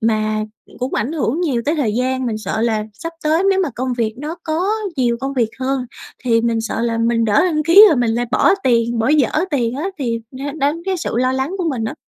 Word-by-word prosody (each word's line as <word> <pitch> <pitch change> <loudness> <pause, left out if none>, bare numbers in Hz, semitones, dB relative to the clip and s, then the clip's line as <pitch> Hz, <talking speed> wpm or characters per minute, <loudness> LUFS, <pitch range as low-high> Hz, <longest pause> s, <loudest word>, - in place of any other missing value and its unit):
mà 215 -1 0 0.3
cũng 255 +1 -3
ảnh 240 +9 -1
hưởng 310 0 -1
nhiều 265 -9 0
tới 305 - +1
thời 230 -8 0
gian. 255 +1 -1
Mình 220 -2 -2
sợ 220 0 -3
là 220 -2 0
sắp 330 +9 -7
tới 315 +4 +2
nếu 385 0 +2
mà 330 - -1
công 255 0 -2
việc 225 -2 -1
nó 305 +4 -5
có 340 +5 -1 0.3
nhiều 240 -2 +1
công 270 +1 -3
việc 235 -4 +1
hơn 260 -1 -1 0.4
thì 230 -2 +3
mình 230 -1 0
sợ 225 0 -3
là 230 -1 0
mình 230 0 +1
lỡ 210 - +3
đăng 310 -4 +1
ký 360 +7 +8
rồi 310 - +2
mình 240 -2 +1
lại 240 +1 -1
bỏ - - +4
tiền 235 -1 +2
bỏ 225 +3 +1
dở 300 -4 +4 0.2
tiền 245 -5 0
á 310 +7 -2
thì 230 -4 -2
nó 275 +2 -5
đánh 305 +2 -1
cái 380 -1 -1
sự 330 - -4
lo 255 +1 +2
lắng 265 +8 -2
của 340 -3 0
mình 240 -6 -2
á. - - -3
255 Hz, 250 wpm, -18 LUFS, 230-305 Hz, 0.4 s, ký